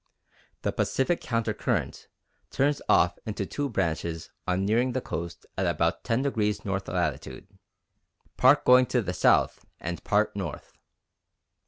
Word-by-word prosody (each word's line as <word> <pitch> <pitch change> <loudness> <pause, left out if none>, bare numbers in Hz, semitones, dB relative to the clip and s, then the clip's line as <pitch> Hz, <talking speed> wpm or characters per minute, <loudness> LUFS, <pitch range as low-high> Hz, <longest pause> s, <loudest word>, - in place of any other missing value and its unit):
The - - +1
Pacific 150 +6 0
Counter 115 -2 -1
Current - - -2 0.4
turns 145 +2 +1
off 90 - +4
into 105 -2 -3
two 145 +7 -3
branches 85 -5 -2 0.2
on 90 +1 +1
nearing 120 +5 +2
the 130 - 0
coast 85 -8 -6
at - - +1
about - - 0
10° 115 -4 0
north 95 -1 -2
latitude, - - -3 0.9
part 135 +3 +5
going 125 0 +6
to 125 -3 +1
the 90 - -3
south - - +3 0.2
and 85 0 -5
part 105 0 +1
north. 90 -7 -6
105 Hz, 135 wpm, -27 LUFS, 90-130 Hz, 0.9 s, going